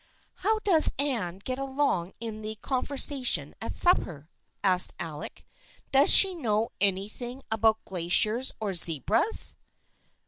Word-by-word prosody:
" - - -43
How 440 0 0
does 335 -6 +7
Anne 235 -11 -4
get 255 0 -7
along 270 -10 -4
in 220 -2 -9
the 215 0 -8
conversation 265 +2 -1
at - - -8
supper 170 - +1
?" - - -48
asked 185 -2 +3
Alec. 155 -4 -10 0.2
" - - -31
Does 275 +2 +3
she 390 -1 +8
know 225 -9 -4
any 195 -1 0
thing 245 +4 -11
about 220 0 -1
glaciers 200 +8 -1
or 210 -3 -6
zebras? 175 - +2
220 Hz, 140 wpm, -24 LUFS, 190-270 Hz, 0.2 s, she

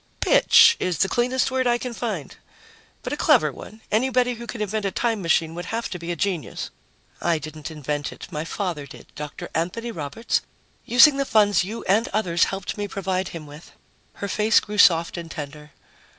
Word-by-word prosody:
"'Bitch' 465 -2 +6
is 180 -3 -1
the 195 - +3
cleanest 250 +4 +1
word 260 -1 +1
I 240 0 +3
can 245 0 -5
find. 210 - -4 0.7
But - - -3
a - - 0
clever - - +4
one. 220 +1 -12
Anybody 250 +2 +2
who 235 0 -9
can 235 - -6
invent 210 0 -2
a 195 - 0
time 225 +1 -1
machine 165 -1 +1
would 175 +1 -6
have 230 +4 -3
to 180 - -5
be 170 +1 -5
a - - -2
genius." 180 -1 -3 0.5
"I 170 -1 +2
didn't 155 +1 -7
invent 150 -2 -4
it. - - -10
My 150 0 -3
father 165 -4 -4
did 135 - -14
Dr. 150 -1 -7
Anthony 205 +9 -2
Roberts 165 +7 -2 0.4
using 245 +4 +7
the 275 - +1
funds 205 -7 +3
you 215 +5 -6
and 215 +5 +2
others 180 -5 +1
helped 195 +1 -5
me 205 - -2
provide 190 -1 -2
him 165 -3 -8
with." 150 +3 -13 0.4
Her 200 - -5
face 210 +2 +3
grew 210 0 -6
soft 170 -1 +5
and 170 -1 -6
tender. 150 0 -8
195 Hz, 195 wpm, -23 LUFS, 165-230 Hz, 0.7 s, using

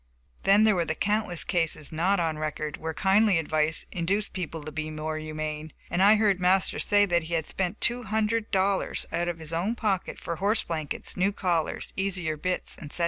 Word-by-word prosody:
Then 200 +2 +6
there 215 -1 +5
were 175 - +1
countless 205 +1 0
cases, 165 -4 0
not 180 +5 +1
on 160 -2 -1
record, 155 -1 -3
where 160 0 -4
kindly 195 +3 +3
advice 155 0 +1
induced 190 +4 -1
people 165 -4 -5
to 155 - -7
be 155 +1 -4
more 155 0 -4
humane, 155 0 -5 0.2
and 180 - +1
I 205 +3 +7
heard 210 -3 +2
Master 185 +1 +2
say 205 0 +4
that 175 -3 +2
he 170 +1 -2
had 160 -2 -1
spent 190 +2 -2
two 240 +1 +1
hundred 220 0 -1
dollars 195 -1 0
out 175 - 0
of 175 -1 -2
his 160 0 -7
own 190 +8 0
pocket 205 -6 -1
for 170 - -4
horse 210 +5 +2
blankets, 155 -3 -3
new 190 +2 +2
collars, 175 -5 -1
easier 185 -5 -1
bits, 180 +4 -3
etc. 150 +2 -3
175 Hz, 195 wpm, -27 LUFS, 155-200 Hz, 0.2 s, I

